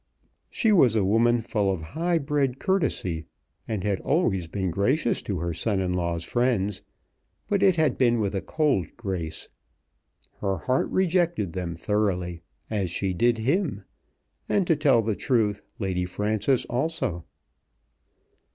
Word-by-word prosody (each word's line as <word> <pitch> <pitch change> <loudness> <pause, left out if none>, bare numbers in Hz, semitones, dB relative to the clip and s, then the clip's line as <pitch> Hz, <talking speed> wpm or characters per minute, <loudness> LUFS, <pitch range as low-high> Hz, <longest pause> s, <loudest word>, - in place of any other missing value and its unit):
She 225 - +1
was 130 - +5
a 105 -3 +2
woman 115 +4 +3
full 105 -3 0
of 95 -4 -3
high 170 +2 +1
bred 140 -4 0
courtesy, 130 - -1 0.4
and 110 -5 -3
had 100 -2 0
always 110 - +1
been 95 +1 -2
gracious 120 - +1
to 100 - -3
her 85 +1 -2
son 100 +4 0
in 90 -1 0
law's 85 -2 -1
friends, 105 -6 0 0.7
but 200 -2 +1
it 190 -3 +5
had 155 -6 +1
been 120 -2 +3
with 100 -2 -1
a 95 - -1
cold 140 - +1
grace. 90 -8 -4 0.9
Her 95 -2 -1
heart 130 +11 0
rejected 170 - +1
them 90 -2 -3
thoroughly, 90 -3 -1 0.3
as 100 -5 -1
she 95 +2 -1
did 120 +5 +2
him, 135 - 0 0.7
and, 195 - +2
to 165 - +3
tell 140 -6 +3
the 110 -1 -1
truth, 110 -5 +1 0.2
Lady 95 -3 -1
Frances 105 +6 0
also. 125 - -2
110 Hz, 145 wpm, -26 LUFS, 95-140 Hz, 0.9 s, was